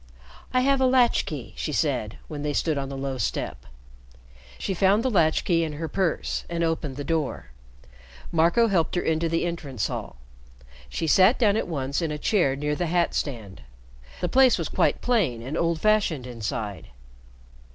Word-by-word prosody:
"I 255 - +3
have 275 +1 +2
a 260 - +5
latch 255 -2 +3
key," 130 -8 -6
she 155 - -3
said, 130 -8 -1
when 150 -2 -6
they 145 0 -2
stood 155 +1 0
on 135 -1 -3
the 135 - -6
low 135 -1 -3
step. 110 - -3 0.9
She 195 - -2
found 195 +4 +3
the 260 - 0
latch 165 -6 +2
key 165 -2 +2
in 155 -2 -3
her 160 +2 -4
purse 175 +1 -1
and 170 0 -1
opened 160 -4 -1
the 145 - -4
door. 150 - -2 0.8
Marco 170 +8 +3
helped 175 -6 +1
her 175 - +1
into 160 +1 0
the 165 +1 0
entrance 145 -9 -3
hall. - - -6 0.7
She 165 - -3
sat 185 - +5
down 210 -4 +3
at - - -1
once 140 -2 -2
in 165 - -1
a 150 - -3
chair 150 -5 +2
near 150 +1 -1
the 175 +3 -2
hat 175 +1 +1
stand. 110 - -4 0.6
The 180 - +1
place 260 +6 +5
was - - -3
quite - - +1
plain 180 - +1
and 135 +5 -5
old 165 -1 0
fashioned 205 -11 +2
inside. 110 -4 -5
160 Hz, 185 wpm, -25 LUFS, 140-185 Hz, 0.9 s, a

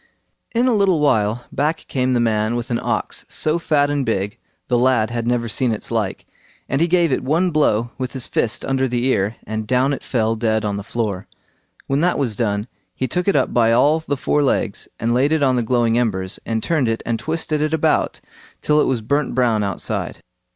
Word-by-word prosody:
In 240 +2 +3
a 250 - +3
little 195 -6 +3
while 120 -5 +1
back 150 +4 -1
came 130 -1 0
the 120 - +2
man 110 -1 +1
with 120 +1 -4
an 115 - +1
ox - - -2
so 155 +2 0
fat 145 -3 +2
and 145 -1 0
big, 105 -1 -2 0.3
the 120 -1 +2
lad 120 -3 +2
had 120 -1 -2
never 120 -1 0
seen 120 +2 0
its 110 - -4
like, 110 -4 -2 0.4
and 135 +3 0
he 170 - +4
gave 170 -2 +3
it 130 - 0
one 165 +7 +1
blow 120 -7 +1
with 130 -1 -3
his 130 -3 -2
fist 110 - -1
under 135 0 +1
the 120 0 -1
ear, 110 -4 +1
and 110 0 -4
down 130 +3 +2
it 135 - -4
fell 115 -3 0
dead 110 -1 0
on 100 -1 -1
the 100 - -5
floor. 105 -4 -3 0.6
When 135 +1 0
that 180 +1 +2
was 125 -7 -1
done, 105 -1 -1 0.3
he 130 - -2
took 180 - -2
it 200 - +3
up 135 - +1
by 115 -2 +4
all 150 +6 +4
the 145 -3 -3
four 150 +3 +1
legs, 120 -6 0
and 115 +2 0
laid 135 +4 +2
it 160 -2 +2
on 130 -2 +3
the 125 - +1
glowing 120 0 +2
embers, 95 -6 -1
and 110 -1 -1
turned 150 -8 +1
it 115 - -2
and 115 -1 -1
twisted 155 -1 -2
it 155 0 0
about 160 -1 +1 0.4
till 150 0 +3
it - - +2
was 125 -4 0
burnt 140 +5 -1
brown 120 -4 +2
outside. 100 -3 -3
125 Hz, 220 wpm, -20 LUFS, 115-145 Hz, 0.6 s, he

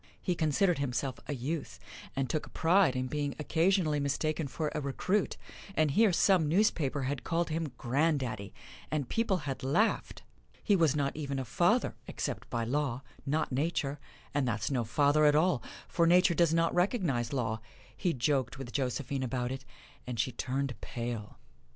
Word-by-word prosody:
He 180 - 0
considered 165 +1 +2
himself 130 -2 -2
a 145 - -2
youth 140 +4 -4 0.4
and 135 -1 0
took 155 - -2
a - - -13
pride 170 -4 +3
in 130 0 -1
being 145 +1 -2
occasionally 160 0 +2
mistaken 155 +2 -1
for 150 +2 -3
a 150 - -2
recruit, 180 +9 0 0.4
and 155 -2 +3
here 215 +6 +5
some 175 -3 +3
newspaper 155 -7 +2
had 135 0 -2
called 165 0 0
him 160 -2 -2
"granddaddy," 130 -6 0 0.4
and 150 -4 -1
people 225 - +1
had 135 -2 -3
laughed! 145 +13 0 0.4
He 205 - +4
was 160 -5 +3
not 140 -2 0
even 140 -3 -3
a 135 - -2
father, - - +2
except - - -4
by 115 - -1
law 135 +1 -1 0.2
not 150 +2 0
Nature 145 0 -1 0.3
and 140 -3 +1
that's 110 +2 -1
no 125 -3 +1
father 145 +6 +3
at 150 0 +5
all, 155 -4 +3 0.3
for 170 -1 +2
Nature 180 +1 +5
does 170 -1 +3
not 165 0 +2
recognize 175 - +1
law. 115 -5 -1 0.3
He 180 - 0
joked 135 -1 0
with 130 -3 -7
Josephine 135 +1 -1
about 125 -1 -2
it, 130 0 -6 0.4
and 120 -3 -4
she 130 - +1
turned 135 +2 -2
pale. 115 -3 -5
145 Hz, 170 wpm, -31 LUFS, 130-165 Hz, 0.4 s, here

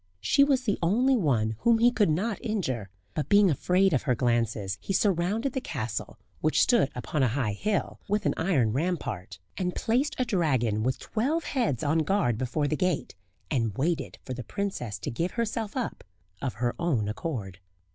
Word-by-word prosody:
She 105 - +4
was 275 -3 +2
the 210 -5 0
only 240 +10 +3
one 115 - +1
whom 235 -1 +4
he 240 +2 +5
could 215 -7 +2
not 200 +8 -1
injure; 130 - -2 0.2
but 150 - -3
being 205 -3 +6
afraid 180 +6 +2
of 130 - +2
her 125 -4 +1
glances, 115 -5 0
he 195 - -3
surrounded 200 +7 +1
the 265 - -2
castle - - -4 0.2
which - - +3
stood 235 - +3
upon 130 +4 -2
a 130 - +4
high 120 -2 0
hill 205 - -1
with 210 0 0
an - - +2
iron 140 - +1
rampart, 130 - -2 0.2
and 180 -1 -1
placed 250 +6 +1
a 255 - +1
dragon 130 - +1
with 130 +3 0
twelve 285 +9 -1
heads 235 - -1
on 155 +2 +2
guard 150 - +1
before 145 +4 0
the 155 - 0
gate, 180 0 -1 0.4
and 115 -5 0
waited 160 +4 -1
for 130 - -5
the 125 0 -6
princess 190 - -3
to - - -5
give 170 +10 -2
herself 230 0 -2
up 250 - -3 0.4
of 130 - -2
her 120 +2 0
own 140 -12 +1
accord. 105 - -4
165 Hz, 185 wpm, -28 LUFS, -, 0.4 s, being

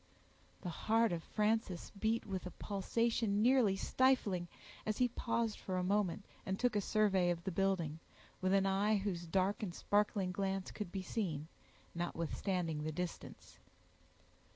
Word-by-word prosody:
The 180 - -4
heart 225 +6 +2
of 170 -1 -2
Frances 210 -4 0
beat 220 +3 0
with 190 -2 -4
a - - -4
pulsation 215 +1 +1
nearly 240 -5 +5
stifling, 205 -6 +2 0.4
as 215 -1 -1
he 250 - +4
paused 230 -2 -1
for 185 -1 -3
a 180 - 0
moment, 200 0 +1 0.2
and 190 0 -2
took 245 0 +1
a 205 - +3
survey 195 -4 +3
of 170 -1 -1
the 190 - -2
building, 175 -4 0 0.4
with 185 0 +2
an 195 0 +4
eye 200 +2 +3
whose 185 -4 -3
dark 190 +5 +1
and 180 -5 -3
sparkling 205 -2 +1
glance 195 0 -2
could 205 -5 -5
be 190 -2 -3
seen, 165 -8 -2 0.4
notwithstanding 170 -1 -2
the 155 - -2
distance. 175 +2 -6
195 Hz, 150 wpm, -36 LUFS, 180-215 Hz, 0.4 s, nearly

